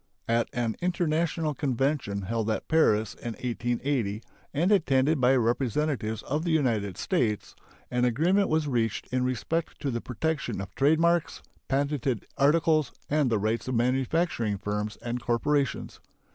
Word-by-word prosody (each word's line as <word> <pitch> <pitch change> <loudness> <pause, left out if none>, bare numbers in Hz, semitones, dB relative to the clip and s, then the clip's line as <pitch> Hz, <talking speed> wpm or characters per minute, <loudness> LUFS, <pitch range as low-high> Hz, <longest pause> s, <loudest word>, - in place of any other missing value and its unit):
At 115 0 +1
an 120 -2 -2
international 165 -3 0
convention 135 -7 -1
held 110 +2 -1
at 110 - -2
Paris 110 -10 +3
in 120 - -6
1880, 120 -1 -2 0.3
and 170 +7 +1
attended 145 -6 +3
by 125 +2 +5
representatives 120 -1 0
of 150 +4 -2
the 170 - -1
United 115 - +1
States, 115 - -1 0.4
an 125 0 +1
agreement 170 - +2
was 155 -1 +1
reached 115 -6 0
in 130 0 +2
respect 130 +6 -2
to 140 - -1
the 120 -1 -2
protection 130 -2 -2
of 95 -1 -7
trade 150 +4 +3
marks, 170 0 +1 0.2
patented 135 -4 -1
articles, 155 +1 +3 0.2
and 150 -3 +3
the 115 - +2
rights 110 +4 -1
of 130 - -1
manufacturing 125 - +1
firms 105 +2 -3
and 120 +1 -3
corporations. 135 +3 0
130 Hz, 145 wpm, -27 LUFS, 115-155 Hz, 0.4 s, by